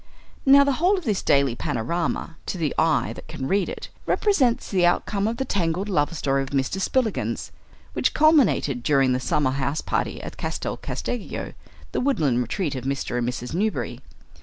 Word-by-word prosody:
Now 280 +1 +8
the 280 - +2
whole 380 +3 +4
of 370 - -5
this 210 -8 0
daily 140 -4 +3
panorama, 160 +8 -2
to - - -2
the 155 -4 -1
eye 160 -1 +2
that - - -11
can 130 - -5
read 195 +2 +1
it, - - -7 0.2
represents 275 - +2
the 185 -3 +2
outcome 200 +3 +2
of 230 +1 -2
the 265 - -1
tangled 185 -2 -1
love 150 -3 0
story 135 -1 +1
of 135 - -4
Mr. 140 +8 -1
Spillikins, 240 0 -1 0.4
which - - 0
culminated 290 - +4
during 135 -1 +3
the 125 - 0
summer 130 +1 +1
houseparty 140 +3 -1
at - - -8
Castel - - -3
Casteggio, 245 -4 -5 0.4
the - - -1
woodland 150 - +2
retreat 150 - -2
of 130 -3 -5
Mr. 135 -2 -2
and 120 0 0
Mrs. 125 0 -5
Newberry. 210 +5 -1
165 Hz, 175 wpm, -24 LUFS, 135-220 Hz, 0.4 s, Now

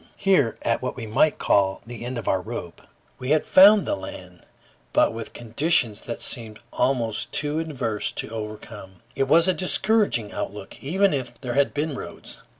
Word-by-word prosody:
Here, 145 - +2
at 115 - 0
what 130 - -3
we 115 - -6
might 115 +8 +2
call 95 -1 +1
the 120 0 -8
end 125 +1 -4
of 115 - -6
our 95 - +1
rope, 105 -5 -7 0.4
we 125 - -5
had 155 0 +3
found 200 +1 +7
the - - 0
land, 90 -2 -10 0.5
but - - +3
with 115 0 -7
conditions 120 -2 0
that 120 - -6
seemed 110 -4 -2 0.2
almost 120 -4 0
too 150 +1 0
adverse 130 -10 -2
to - - -4
overcome. 105 -3 -8
It 135 - 0
was 165 +5 +5
a 185 - +4
discouraging 190 - +1
outlook, - - -7
even 190 +7 +2
if 125 -4 -4
there 125 -3 -4
had 140 +2 +2
been 150 +1 -1
roads. 130 - -8
120 Hz, 175 wpm, -24 LUFS, 110-155 Hz, 0.5 s, found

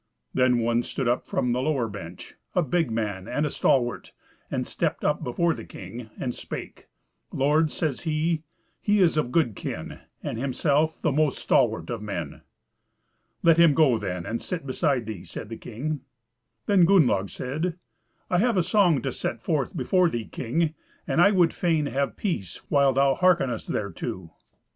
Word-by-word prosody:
Then 125 -1 +3
one 115 0 +2
stood 130 +1 -3
up 120 +1 0
from 125 - 0
the 125 +1 0
lower 135 -5 0
bench, 90 -4 -9 0.2
a - - +3
big 165 0 +1
man 105 -4 -3
and 145 +6 0
a 150 - -2
stalwart, 120 -2 +1 0.4
and - - -2
stepped - - -2
up - - +1
before 165 +7 +1
the - - -8
king, 115 -1 -9
and 125 -2 -2
spake: - - -8 0.4
"Lord," 150 +4 +2
says 150 -3 -2
he, 160 0 0 0.4
"he 205 0 +2
is 175 -4 +4
of 150 -5 0
good 130 - +2
kin, - - -6 0.2
and 115 - -3
himself 145 +4 +1
the 160 - +3
most 150 -1 +1
stalwart - - +1
of - - -4
men." 85 -8 -5 1.0
"Let 165 -1 +5
him 165 -4 +6
go, 135 -8 +4
then, 90 -4 -4
and 115 - -3
sit 175 -5 -4
beside 135 -2 0
thee," 105 -5 -6
said 90 +3 -8
the 115 - -5
king. 140 +5 -4 0.6
Then 195 -4 +5
Gunnlaug 125 - +4
said, 160 +7 -3 0.5
"I 180 - +2
have 230 0 +2
a 180 - +4
song 180 -5 +3
to 135 - -1
set 115 - -3
forth 140 +1 -1
before 185 -2 +3
thee, 120 -6 -3
king, 150 - -1 0.3
and 170 - +2
I 200 - +7
would 180 -5 +3
fain 165 -4 +1
have 140 0 -1
peace 100 - -3
while 140 -2 +4
thou 135 +1 +3
hearkenest 150 -8 +2
thereto." 95 -3 -4
140 Hz, 170 wpm, -26 LUFS, 115-165 Hz, 1.0 s, I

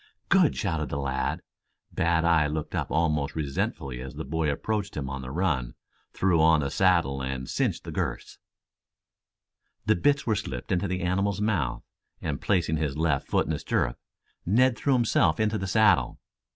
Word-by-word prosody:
"Good!" 185 -6 +4
shouted 80 -7 -2
the 70 - -3
lad. 65 -2 -2 0.5
Bad 85 -2 +1
eye 80 -3 +4
looked 75 0 -4
up - - -2
almost 75 -3 0
resentfully 70 -3 -3
as 65 0 -8
the - - -5
boy 80 +2 -1
approached 100 +6 -2
him 65 -2 -3
on 70 -1 -4
the 65 - -7
run, 70 -6 -1 0.4
threw 90 -4 +2
on 80 -1 +5
the 70 -1 -2
saddle 85 -8 +2
and 65 -1 -4
cinched - - -1
the - - -7
girths. - - -4 1.5
The 85 - +2
hits 145 0 +3
were 110 - +2
slipped 65 -11 -4
into 95 +2 +1
the 90 -1 -2
animal's 95 +2 0
mouth, 95 - -1 0.4
and, 75 -4 -4
placing 85 -5 +1
his 75 -2 -2
left 80 -4 0
foot - - +1
in - - -3
the - - -3
stirrup, - - -1 0.4
Ned 120 +7 +3
threw 140 +4 +1
himself 115 -10 +2
into 110 0 +1
the 95 - -3
saddle. 105 - +3
80 Hz, 175 wpm, -27 LUFS, 70-100 Hz, 1.5 s, on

